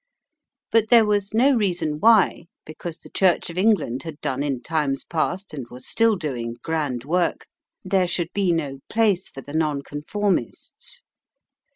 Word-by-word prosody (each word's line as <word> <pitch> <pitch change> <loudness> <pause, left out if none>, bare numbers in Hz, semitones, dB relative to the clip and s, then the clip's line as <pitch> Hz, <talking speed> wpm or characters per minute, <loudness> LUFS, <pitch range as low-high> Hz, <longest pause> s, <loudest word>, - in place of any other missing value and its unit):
But 225 -1 +3
there 235 -2 +7
was 205 -1 0
no 245 +6 +4
reason 175 -8 0
why, 215 -5 +4 0.2
because 155 +2 -7
the - - -15
Church 185 -2 +2
of 170 - -10
England 195 - +2
had 160 -3 -8
done 130 +1 -2
in 135 -4 -2
times 150 -3 -1
past 180 +3 -2
and 135 -5 -6
was 125 +1 -11
still 230 -1 +3
doing 125 -9 -4
grand 145 -7 -2
work, 175 +3 0 0.4
there 185 -1 +2
should 175 -1 -1
be 195 -3 +2
no 145 -5 -2
place 205 -5 +2
for 135 - -9
the 145 - -11
Nonconformists. 155 - -2
165 Hz, 155 wpm, -23 LUFS, 145-200 Hz, 0.4 s, there